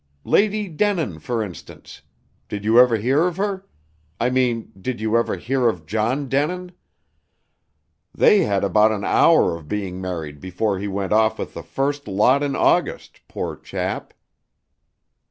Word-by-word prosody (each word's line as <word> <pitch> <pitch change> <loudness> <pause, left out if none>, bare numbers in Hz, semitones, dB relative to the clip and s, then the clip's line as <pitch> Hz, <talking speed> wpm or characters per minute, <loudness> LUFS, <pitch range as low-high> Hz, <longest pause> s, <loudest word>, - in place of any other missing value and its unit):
Lady 210 0 +2
Denin, 165 - -1
for 115 +5 -2
instance. 95 -5 -11 0.5
Did 105 0 -5
you 115 +2 +5
ever 125 -2 +5
hear 135 +10 +2
of 180 -1 -4
her? 195 -1 -3 0.5
I 125 +2 +1
mean, 125 -3 0
did 130 +4 -3
you 110 +1 0
ever 115 - +1
hear 125 0 +1
of 90 -7 -5
John 115 - -1
Denin? 180 +7 -1 1.4
They 210 - +4
had 100 - +1
about 105 +3 +4
an 105 -2 -3
hour 160 - +4
of 80 -3 -11
being 95 -1 -4
married 80 -6 -5
before 95 +4 -2
he 100 - -4
went 100 0 -2
off 110 0 +3
with - - -6
the - - -7
first 140 0 -3
lot 105 +8 +3
in 145 -1 -1
August, - - 0
poor - - -4
chap." - - -5
115 Hz, 155 wpm, -21 LUFS, 100-145 Hz, 1.4 s, you